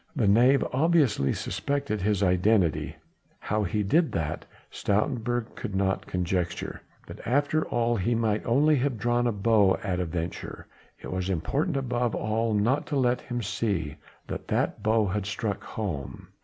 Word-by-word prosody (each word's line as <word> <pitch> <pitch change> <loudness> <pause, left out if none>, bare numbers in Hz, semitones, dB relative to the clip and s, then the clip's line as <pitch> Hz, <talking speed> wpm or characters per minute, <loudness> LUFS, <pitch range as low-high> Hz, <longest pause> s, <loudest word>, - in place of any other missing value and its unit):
The 120 -8 +2
knave 125 +7 +5
obviously 140 - +3
suspected 140 -7 -2
his 100 0 +1
identity 90 -2 +2 0.4
how 105 +1 -1
he 105 +2 0
did 160 - +2
that, 75 -2 -3 0.2
Stoutenburg 120 +2 -1
could 95 - -5
not 95 0 0
conjecture, 90 -1 -2 0.2
but - - -10
after 145 +5 +1
all 120 0 +1
he 115 +5 +1
might 110 -2 0
only 145 +5 +3
have 130 -2 0
drawn 120 +2 +1
a - - +2
bow 105 -2 +3
at 95 -4 -1
a 90 - 0
venture: 85 +1 -5 0.3
it - - -8
was 95 0 -2
important 115 - 0
above 125 -3 -1
all 110 +1 0
not 120 +8 +1
to 150 - -2
let 125 -2 +2
him 120 -2 -4
see 95 -8 -2 0.3
that - - -6
that - - 0
bow 110 0 +2
had 100 0 -2
struck 105 -1 -3
home. 90 -11 -5
110 Hz, 155 wpm, -27 LUFS, 95-120 Hz, 0.4 s, knave